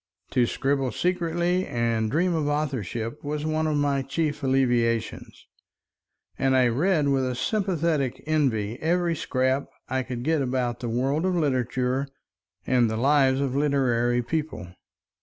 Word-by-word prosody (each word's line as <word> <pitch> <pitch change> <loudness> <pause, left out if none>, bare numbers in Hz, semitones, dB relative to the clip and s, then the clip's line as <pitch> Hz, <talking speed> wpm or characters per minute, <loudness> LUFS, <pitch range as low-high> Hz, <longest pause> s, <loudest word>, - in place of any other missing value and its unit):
To 125 -2 +2
scribble 135 -1 0
secretly 175 +3 0
and 115 -2 0
dream 175 +7 +1
of 155 -3 0
authorship 130 - -3
was 150 +1 -3
one 155 0 0
of 150 -1 0
my 140 -1 +1
chief 145 +2 -2
alleviations, 120 -4 0 0.9
and 130 0 +3
I 125 -2 +4
read 150 +4 +2
with 135 -1 +2
a 130 -1 -1
sympathetic 165 - -1
envy 125 -8 0
every 170 +1 +1
scrap 130 -1 0 0.2
I 130 0 -1
could 125 -1 -5
get 160 +1 +1
about 125 -2 -1
the 120 - -4
world 135 +7 0
of 185 -1 +1
literature 130 -3 0 0.6
and 125 -3 +3
the 110 - -2
lives 135 +1 +3
of 135 -2 -1
literary 125 -4 +1
people. 150 - -3
135 Hz, 140 wpm, -25 LUFS, 125-155 Hz, 0.9 s, I